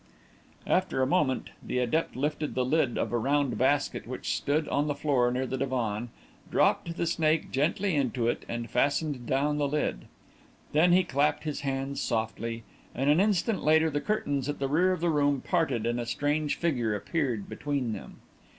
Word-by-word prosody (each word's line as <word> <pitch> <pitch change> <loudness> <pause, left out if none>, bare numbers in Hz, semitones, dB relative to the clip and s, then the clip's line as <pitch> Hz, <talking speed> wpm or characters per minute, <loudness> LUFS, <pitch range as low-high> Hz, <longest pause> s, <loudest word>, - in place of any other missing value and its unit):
After 185 -8 +1
a - - +3
moment, 130 0 +1
the - - -3
adept 125 +6 0
lifted 150 +3 -2
the 130 -1 +1
lid 135 -2 +1
of - - -1
a 120 - +1
round 140 +1 +1
basket 140 +3 +1
which - - -3
stood 150 +2 0
on 145 +1 0
the 145 - -1
floor 130 -5 +2
near 125 +1 -1
the 130 0 -3
divan, 120 -4 -1 0.4
dropped 170 0 +1
the - - 0
snake 160 -1 +1
gently 170 +8 +1
into 125 -4 0
it, 120 - -1
and 115 0 -3
fastened 140 0 0
down 145 +3 +1
the 145 - +1
lid. 145 - -2 0.7
Then 165 +4 +4
he 185 +1 +5
clapped 145 -2 +1
his 150 -2 -3
hands 135 0 -2
softly, 115 0 -2 0.3
and 135 +3 +2
an 155 - +4
instant 205 0 +1
later 160 +1 +4
the 145 0 -1
curtains 145 -10 -1
at 145 - -2
the 135 - -1
rear 175 +7 +3
of 185 - -2
the 170 -1 +2
room 145 -2 +2
parted 160 -8 0
and 120 +1 0
a 120 - -4
strange 145 +4 0
figure 120 -11 0
appeared 120 - -2
between 140 -6 -2
them. - - -9
145 Hz, 185 wpm, -28 LUFS, 125-155 Hz, 0.7 s, he